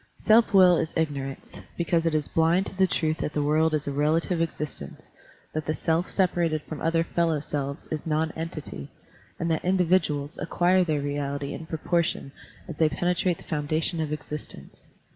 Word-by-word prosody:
Self 225 Hz, +1 st, +4 dB
will 185 Hz, -3 st, +7 dB
is 160 Hz, 0 st, -2 dB
ignorance, 140 Hz, -4 st, -3 dB, 0.2 s
because 170 Hz, -1 st, +1 dB
it 160 Hz, -, +1 dB
is 150 Hz, -2 st, 0 dB
blind 165 Hz, +4 st, +2 dB
to -, -, -7 dB
the 190 Hz, 0 st, +4 dB
truth 155 Hz, -2 st, 0 dB
that 150 Hz, -, -2 dB
the 150 Hz, -, 0 dB
world 155 Hz, +2 st, +3 dB
is 150 Hz, -1 st, -2 dB
a -, -, 0 dB
relative 160 Hz, +4 st, +1 dB
existence, 150 Hz, -, -4 dB, 0.4 s
that 155 Hz, -1 st, -3 dB
the 155 Hz, -, 0 dB
self, 165 Hz, +5 st, 0 dB
separated 170 Hz, -5 st, +1 dB
from 155 Hz, -, -7 dB
other 165 Hz, 0 st, +2 dB
fellow 165 Hz, -2 st, 0 dB
selves 140 Hz, 0 st, -3 dB
is 155 Hz, 0 st, -3 dB
non 160 Hz, +1 st, +1 dB
entity, 155 Hz, -, -6 dB, 0.5 s
and 170 Hz, 0 st, 0 dB
that 160 Hz, -, 0 dB
individuals 175 Hz, -5 st, +1 dB
acquire 180 Hz, +1 st, +3 dB
their 155 Hz, -4 st, 0 dB
reality 140 Hz, 0 st, -3 dB
in 160 Hz, -, -7 dB
proportion 165 Hz, -2 st, -1 dB, 0.4 s
as 165 Hz, -4 st, -7 dB
they 160 Hz, -1 st, +4 dB
penetrate 175 Hz, +3 st, 0 dB
the -, -, -14 dB
foundation 155 Hz, +2 st, -1 dB
of 155 Hz, -1 st, -3 dB
existence. 150 Hz, -1 st, -7 dB
160 Hz, 175 wpm, -26 LUFS, 150-170 Hz, 0.5 s, will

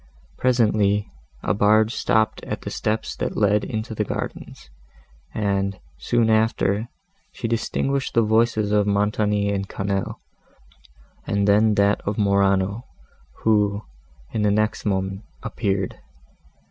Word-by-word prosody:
Presently, 105 Hz, -, +2 dB, 0.3 s
a -, -, +1 dB
barge 110 Hz, +3 st, +3 dB
stopped 110 Hz, 0 st, +1 dB
at -, -, -4 dB
the -, -, -5 dB
steps 110 Hz, +1 st, -2 dB
that -, -, -3 dB
led 105 Hz, 0 st, +3 dB
into 110 Hz, -1 st, -4 dB
the 105 Hz, -, -1 dB
gardens, -, -, -6 dB, 0.6 s
and, 100 Hz, -2 st, -1 dB, 0.2 s
soon 120 Hz, -2 st, +1 dB
after, 110 Hz, 0 st, +1 dB, 0.4 s
she 120 Hz, -, -4 dB
distinguished 135 Hz, +4 st, -1 dB
the 115 Hz, -, +5 dB
voices 110 Hz, -1 st, +2 dB
of 105 Hz, -1 st, +2 dB
Montoni 105 Hz, 0 st, +1 dB
and 100 Hz, -1 st, -3 dB
Quesnel, 95 Hz, 0 st, -2 dB, 1.1 s
and 100 Hz, 0 st, +1 dB
then 105 Hz, +1 st, +4 dB
that 100 Hz, 0 st, +2 dB
of 100 Hz, +1 st, -3 dB
Morano, 100 Hz, +2 st, +1 dB, 0.6 s
who, 105 Hz, -1 st, +2 dB, 0.5 s
in 110 Hz, -, -1 dB
the 105 Hz, -, +3 dB
next 110 Hz, +1 st, 0 dB
moment, 95 Hz, 0 st, -1 dB, 0.2 s
appeared. 95 Hz, -1 st, -2 dB
105 Hz, 120 wpm, -23 LUFS, 100-110 Hz, 1.1 s, the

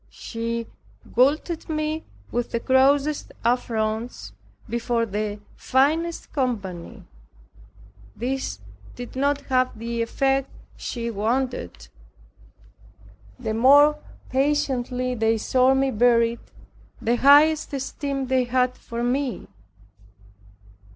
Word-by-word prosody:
She 230 Hz, 0 st, -4 dB, 0.5 s
galled 300 Hz, +7 st, +2 dB
me 310 Hz, 0 st, -2 dB, 0.3 s
with 240 Hz, 0 st, -1 dB
the 235 Hz, -, -1 dB
grossest 275 Hz, +4 st, +2 dB
affronts 230 Hz, -1 st, -1 dB, 0.4 s
before 235 Hz, 0 st, 0 dB
the 210 Hz, 0 st, -3 dB, 0.2 s
finest 315 Hz, +6 st, 0 dB
company. 205 Hz, -, -3 dB, 1.1 s
This 265 Hz, +3 st, -3 dB, 0.3 s
did 245 Hz, 0 st, -8 dB
not 285 Hz, +2 st, +1 dB
have 255 Hz, -3 st, 0 dB
the 230 Hz, +1 st, -3 dB
effect 270 Hz, +3 st, 0 dB, 0.3 s
she 235 Hz, -1 st, -4 dB
wanted; 220 Hz, -, -2 dB, 1.5 s
the 220 Hz, -, -3 dB
more 285 Hz, +6 st, +6 dB, 0.3 s
patiently 260 Hz, -2 st, 0 dB
they 225 Hz, -1 st, +1 dB
saw 255 Hz, +4 st, +3 dB
me 270 Hz, 0 st, +1 dB
bear 235 Hz, 0 st, +4 dB
it, 230 Hz, +1 st, -4 dB, 0.5 s
the 235 Hz, +2 st, +1 dB
higher 290 Hz, +4 st, +7 dB
esteem 275 Hz, -2 st, -4 dB
they 260 Hz, -1 st, +1 dB
had 250 Hz, +1 st, +1 dB
for 235 Hz, 0 st, -6 dB
me. 255 Hz, +1 st, -1 dB
255 Hz, 95 wpm, -24 LUFS, 230-275 Hz, 1.5 s, higher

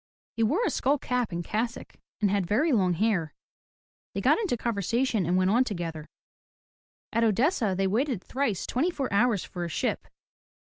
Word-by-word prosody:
He 230 Hz, -, -2 dB
wore 300 Hz, -, +2 dB
a -, -, +1 dB
skull 280 Hz, +3 st, +1 dB
cap 250 Hz, -5 st, -1 dB
and 170 Hz, 0 st, -3 dB
cassock, 225 Hz, +6 st, -3 dB, 0.3 s
and 205 Hz, -2 st, +3 dB
had 200 Hz, -3 st, 0 dB
very 265 Hz, -, +2 dB
long 190 Hz, -7 st, +3 dB
hair. 175 Hz, -5 st, 0 dB, 0.8 s
They -, -, -1 dB
got -, -, +4 dB
into 395 Hz, -, -1 dB
conversation 230 Hz, -2 st, 0 dB
and 180 Hz, +1 st, +2 dB
went 185 Hz, +1 st, +3 dB
on 240 Hz, +4 st, +4 dB
together. 165 Hz, -8 st, -5 dB, 1.1 s
At 230 Hz, 0 st, +2 dB
Odessa 225 Hz, -, +2 dB
they 195 Hz, -, +1 dB
waited 225 Hz, +1 st, 0 dB
thrice 250 Hz, -8 st, -1 dB
twenty 280 Hz, +9 st, 0 dB
four 275 Hz, -, -3 dB
hours 220 Hz, -2 st, +3 dB
for 175 Hz, -, -6 dB
a 170 Hz, -, -3 dB
ship. -, -, -2 dB
220 Hz, 175 wpm, -27 LUFS, 185-250 Hz, 1.1 s, got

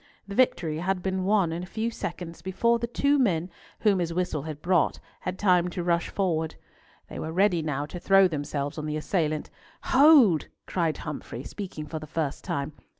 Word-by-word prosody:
The 200 Hz, -, -6 dB
victory 200 Hz, -10 st, +2 dB
had 180 Hz, +1 st, -1 dB
been 190 Hz, -1 st, -1 dB
won 195 Hz, -4 st, +3 dB
in 165 Hz, +1 st, -3 dB
a 180 Hz, -, -7 dB
few 225 Hz, +4 st, -2 dB
seconds, 170 Hz, -5 st, -6 dB
before 235 Hz, +5 st, +1 dB
the 235 Hz, -, -2 dB
two 280 Hz, +4 st, +2 dB
men, 180 Hz, -7 st, +1 dB, 0.3 s
whom 205 Hz, -4 st, +3 dB
his 170 Hz, -1 st, -1 dB
whistle 175 Hz, -3 st, -1 dB
had 155 Hz, 0 st, -6 dB
brought, 175 Hz, 0 st, +2 dB, 0.2 s
had 180 Hz, +1 st, -4 dB
time 180 Hz, -3 st, +3 dB
to 175 Hz, 0 st, -4 dB
rush 170 Hz, -1 st, +1 dB
forward. 160 Hz, -5 st, -1 dB, 0.5 s
They -, -, -7 dB
were 160 Hz, -, -4 dB
ready 185 Hz, -1 st, +3 dB
now 145 Hz, -2 st, -2 dB
to 175 Hz, +4 st, -7 dB
throw 195 Hz, +1 st, +5 dB
themselves 145 Hz, -2 st, -3 dB
on 155 Hz, -, -4 dB
the 150 Hz, 0 st, -2 dB
assailant. 155 Hz, -2 st, -1 dB, 0.4 s
"Hold!" 260 Hz, -, +6 dB, 0.2 s
cried 165 Hz, -4 st, -1 dB
Humfrey, 140 Hz, -4 st, -6 dB
speaking 180 Hz, -6 st, -6 dB
for 155 Hz, +1 st, -5 dB
the 155 Hz, -, -9 dB
first 155 Hz, -2 st, -3 dB
time. 140 Hz, +2 st, -3 dB
175 Hz, 190 wpm, -27 LUFS, 155-195 Hz, 0.5 s, Hold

